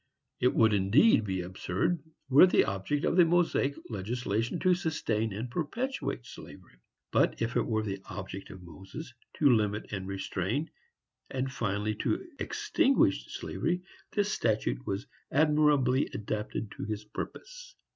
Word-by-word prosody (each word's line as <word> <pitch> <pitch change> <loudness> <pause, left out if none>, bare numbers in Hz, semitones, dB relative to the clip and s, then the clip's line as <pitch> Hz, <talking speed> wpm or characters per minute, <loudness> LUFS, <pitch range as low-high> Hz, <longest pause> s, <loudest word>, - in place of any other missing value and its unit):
It 125 - +2
would 110 -1 +5
indeed 105 - +5
be 95 -2 -1
absurd, 95 - -1 0.3
were 135 +1 +6
it - - +1
the - - +4
object 100 +10 -1
of - - +1
the 180 - +9
Mosaic 165 -4 +2
legislation 115 - -2
to 185 -1 +4
sustain 150 - -1
and 110 +5 -5
perpetuate 180 - -3
slavery; 115 - -12 0.3
but, - - +2
if 115 +1 -1
it - - +1
were 110 -2 0
the 100 -2 -4
object 95 -1 -7
of 95 -1 -10
Moses 95 - -9 0.2
to 150 - +4
limit 105 -1 -1
and 95 -2 -3
to - - -7
restrain, 100 - -2 0.6
and 130 0 -2
finally 105 -2 -1
to 375 - -1
extinguish 420 -10 +2
slavery, 180 +1 -2 0.3
this 205 0 +1
statute - - 0
was 100 +1 -2 0.3
admirably 150 -3 +3
adapted 105 0 -3
to - - -6
his 105 0 -4
purpose. - - -8
115 Hz, 145 wpm, -30 LUFS, 100-155 Hz, 0.6 s, the